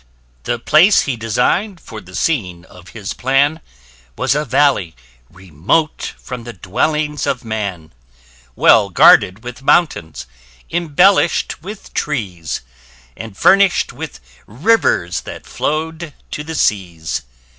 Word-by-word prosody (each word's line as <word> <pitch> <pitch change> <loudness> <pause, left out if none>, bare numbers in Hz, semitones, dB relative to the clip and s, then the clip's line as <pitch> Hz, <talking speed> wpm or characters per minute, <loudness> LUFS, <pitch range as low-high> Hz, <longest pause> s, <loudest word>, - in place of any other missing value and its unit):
The 120 - -1
place 155 - +5
he 140 - -2
design'd 125 - 0
for 110 -7 -10
the 90 -1 -13
scene 90 - -2
of 90 -1 -16
his 100 -2 -5
plan, 140 +5 +1 0.6
Was - - +1
a 150 +1 0
valley 115 - +1 0.3
remote 95 - -2
from 125 -2 -8
the 120 0 -8
dwellings 150 - -1
of 125 -2 -2
man: 100 - -5 0.6
Well 105 -3 +5
guarded 95 +3 +5
with 125 +1 -8
mountains, 80 - +1 0.5
embellished 175 +2 +2
with 200 +4 -10
trees, 95 - -3 0.5
And 110 -3 -9
furnish'd 195 -1 +4
with - - -8 0.3
rivers, 115 - +1
that - - -10
flow'd 160 +1 -3 0.2
to 150 - -4
the 160 +1 -6
seas. 90 - -1
125 Hz, 120 wpm, -17 LUFS, 95-155 Hz, 0.6 s, place